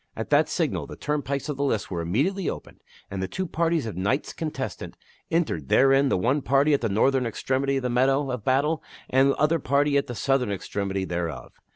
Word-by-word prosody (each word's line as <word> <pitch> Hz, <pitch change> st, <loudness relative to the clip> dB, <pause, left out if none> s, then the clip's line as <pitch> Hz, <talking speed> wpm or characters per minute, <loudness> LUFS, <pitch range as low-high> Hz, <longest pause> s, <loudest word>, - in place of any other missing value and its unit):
At -, -, -5 dB
that -, -, +4 dB
signal -, -, -1 dB
the -, -, -8 dB
turnpikes 140 Hz, -2 st, -2 dB
of 150 Hz, -3 st, -3 dB
the 140 Hz, -, -1 dB
lists 115 Hz, -8 st, -1 dB
were 85 Hz, -2 st, -2 dB
imme 100 Hz, -, +1 dB
diately 195 Hz, -2 st, -2 dB
opened -, -, -8 dB, 0.3 s
and 95 Hz, -1 st, -3 dB
two 190 Hz, -, -2 dB
parties 165 Hz, -3 st, 0 dB
of 110 Hz, -, -5 dB
knights 100 Hz, -, -1 dB
contestant 135 Hz, -, -5 dB, 0.3 s
entered 150 Hz, -, -1 dB
therein 135 Hz, +1 st, +5 dB
the -, -, +2 dB
one 130 Hz, +10 st, +1 dB
party 140 Hz, +3 st, +3 dB
at 140 Hz, -, +2 dB
the 115 Hz, -, 0 dB
northern 125 Hz, +5 st, +2 dB
extremity 135 Hz, +4 st, -1 dB
of 135 Hz, -, -3 dB
the 125 Hz, -, 0 dB
meadow 135 Hz, +3 st, +2 dB
of 125 Hz, -4 st, -4 dB
battle 145 Hz, +6 st, +1 dB, 0.3 s
and 135 Hz, +1 st, +4 dB
the -, -, +2 dB
other 155 Hz, +2 st, +2 dB
party 140 Hz, +1 st, +2 dB
at 140 Hz, -, 0 dB
the 120 Hz, -, -5 dB
southern 135 Hz, -3 st, +1 dB
extremity 100 Hz, 0 st, -3 dB
thereof. 85 Hz, -4 st, -4 dB
135 Hz, 210 wpm, -25 LUFS, 110-145 Hz, 0.3 s, therein